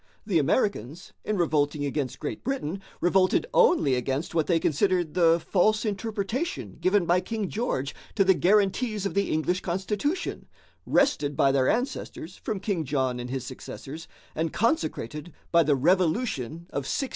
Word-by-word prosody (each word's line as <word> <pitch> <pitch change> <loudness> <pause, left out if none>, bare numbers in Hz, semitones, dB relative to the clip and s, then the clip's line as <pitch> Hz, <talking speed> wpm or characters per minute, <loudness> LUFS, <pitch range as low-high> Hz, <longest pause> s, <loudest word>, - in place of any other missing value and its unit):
The 190 -6 +2
Americans, 155 - -1
in 215 - -1
revolting 150 -3 +1
against 140 -2 -2
Great 150 - -5
Britain, 195 - -3 0.2
revolted 185 - +3
only 355 - +4
against 135 +6 -2
what 160 -2 +1
they 170 -2 +3
considered 175 +1 +1
the 170 -2 +4
false 210 +6 +2
interpretation 220 - -3
given 190 -1 +3
by 175 +2 +3
King 215 +1 -3
George 170 - -2 0.2
to 200 - +4
the 190 0 +5
guarantees 205 +3 +2
of 195 - -1
the 200 0 +1
English 175 +4 0
constitution, 210 - -2 0.4
wrested 150 - +2
by 135 - +4
their 135 -1 +2
ancestors 230 - -3
from 210 -3 -4
King 195 -4 -1
John 130 -3 -1
and 120 0 -5
his 130 -1 -3
successors 140 +4 -8 0.3
and 160 0 -1
consecrated 175 - -1 0.2
by 170 - +6
the 150 -2 +3
Revolution 170 - 0
of 140 - -2
1688. 270 - -1
175 Hz, 155 wpm, -26 LUFS, 145-210 Hz, 0.4 s, by